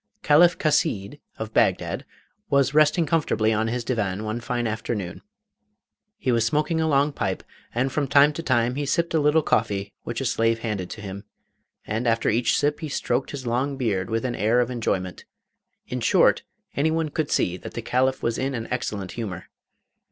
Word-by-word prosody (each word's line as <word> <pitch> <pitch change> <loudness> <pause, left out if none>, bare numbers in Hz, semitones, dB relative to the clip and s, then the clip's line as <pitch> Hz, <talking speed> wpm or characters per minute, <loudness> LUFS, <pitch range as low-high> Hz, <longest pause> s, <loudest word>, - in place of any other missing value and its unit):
Caliph 170 +4 +5
Chasid, 145 - 0 0.2
of 110 0 -6
Bagdad, - - +1 0.4
was 140 0 +3
resting 155 +2 +4
comfortably 145 -9 +1
on 110 +1 0
his 120 +1 -2
divan 105 -5 -2
one 110 +2 -3
fine 120 -1 -2
afternoon. 110 -5 -3 1.0
He 130 - 0
was 115 -2 +2
smoking 150 +7 +1
a 160 - +1
long 145 0 +2
pipe, - - -2 0.3
and 130 +3 +1
from 145 +1 -1
time 145 +2 +5
to 165 - -4
time 120 -5 +1
he 145 +2 -2
sipped 170 +3 0
a 160 - +3
little 150 +1 +3
coffee 100 -4 0
which 120 -1 -4
a 135 - -3
slave 115 -1 +1
handed 105 -6 -3
to 110 - -8
him, 100 0 -7 0.6
and 115 +3 -2
after 115 0 +2
each 120 +3 +2
sip 145 0 +1
he 155 - -5
stroked 130 -1 -1
his 135 -3 -6
long 130 +4 -1
beard 100 -8 -1
with 115 +2 -1
an 125 - -1
air 110 +3 +2
of 125 0 +1
enjoyment. 95 -7 -2 0.6
In - - -4
short, - - +4 0.3
anyone 160 +2 +1
could 150 0 -2
see 90 - +1
that - - -10
the 115 - -4
Caliph 130 +2 +1
was 115 -1 0
in 135 0 -1
an 115 -1 -4
excellent 105 -6 -3
humour. 105 -7 -6
120 Hz, 185 wpm, -24 LUFS, 110-145 Hz, 1.0 s, Caliph